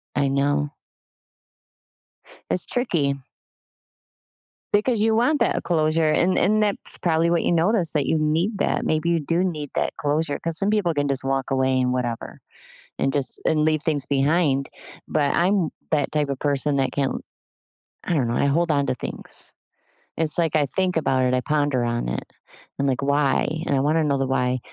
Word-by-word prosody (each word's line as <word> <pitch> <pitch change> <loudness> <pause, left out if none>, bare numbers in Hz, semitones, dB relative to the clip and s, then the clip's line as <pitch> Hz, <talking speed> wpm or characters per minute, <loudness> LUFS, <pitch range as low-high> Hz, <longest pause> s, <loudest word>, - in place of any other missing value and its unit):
I 140 -1 +2
know. 145 +2 0 1.8
It's 180 - -2
tricky. 155 - 0 1.6
Because 215 +2 +2
you 220 0 +3
want 255 +7 +2
that - - +1
closure, 155 -1 +1
and 180 +4 +2
and 215 +2 +3
that's 205 -1 -2
probably 165 -1 +2
what 170 -1 +1
you - - +1
noticed 175 0 +2
that 145 -3 +1
you 160 - +1
need 165 +8 0
that. - - 0
Maybe 155 +2 0
you 170 - +2
do 165 +4 0
need 155 -6 -3
that - - -1
closure 145 +1 -1
'cause 165 -1 -3
some 195 +2 +2
people 205 -6 +1
can 145 -1 0
just 135 -1 -1
walk 135 0 -1
away 130 -1 +2
and 125 0 +1
whatever 120 -2 -4 0.6
and 135 - +1
just, 140 -2 0
and 155 -1 +2
leave 155 -1 +1
things 150 -4 0
behind. 140 0 +1 0.4
But 145 -2 +1
I'm 180 -1 +2 0.2
that 150 -3 0
type 150 -2 0
of 140 -1 -3
person 145 0 0
that 135 -1 0
can't 140 -2 -1 0.8
I 175 - -1
don't 130 -7 +1
know. 120 - -1
I - - +1
hold 165 +4 +1
on 140 -2 +2
to - - 0
things. - - -8 0.7
It's 160 -2 +2
like 165 -3 +1
I 150 - +3
think 185 +4 -1
about 130 -5 +1
it. 125 - +1
I 125 - +1
ponder 145 -4 0
on 120 - -1
it. 65 - -3 0.6
I'm 140 - +1
like, 135 -1 0
"Why?" 140 0 +2 0.2
And 140 - 0
I - - +2
wanna 155 +4 +2
know 140 -2 +1
the 135 - 0
why. 125 -1 0
150 Hz, 185 wpm, -23 LUFS, 135-170 Hz, 1.8 s, you